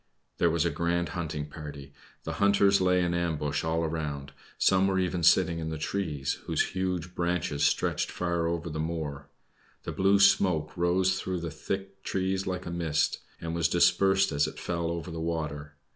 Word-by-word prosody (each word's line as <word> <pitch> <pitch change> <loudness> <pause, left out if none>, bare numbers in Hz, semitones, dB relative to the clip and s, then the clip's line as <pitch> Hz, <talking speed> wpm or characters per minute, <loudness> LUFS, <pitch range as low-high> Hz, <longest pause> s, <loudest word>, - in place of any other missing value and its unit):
There 85 - +4
was 85 0 +1
a 85 - +1
grand 85 +3 0
hunting 80 -4 -3
party. 70 -2 -9 0.3
The - - -4
hunters 100 -1 +4
lay 90 -1 +3
in 85 0 0
ambush 75 -4 -1
all 80 +1 0
around; 75 -3 -3 0.3
some 95 0 +4
were 95 -1 +1
even 90 -1 0
sitting 85 0 +4
in 80 -1 -3
the 80 - -4
trees, 75 -4 -2
whose - - +1
huge 90 -2 -2
branches 85 -5 -1
stretched - - 0
far 85 -2 -1
over 85 0 -2
the 80 -1 -4
moor. 80 -3 -4 0.6
The - - -4
blue 95 +1 +3
smoke 90 -6 +3
rose 90 +2 +2
through 90 -3 -3
the 85 -2 -4
thick 95 +5 -5
trees 95 0 -1
like 90 -1 -3
a 85 - -5
mist, 80 -3 0 0.2
and 80 0 -4
was 85 -2 +2
dispersed 95 +2 +4
as 70 0 +2
it - - -8
fell 85 -1 -2
over 85 0 -4
the 80 0 -5
water. 75 -3 -3
85 Hz, 180 wpm, -28 LUFS, 80-90 Hz, 0.6 s, There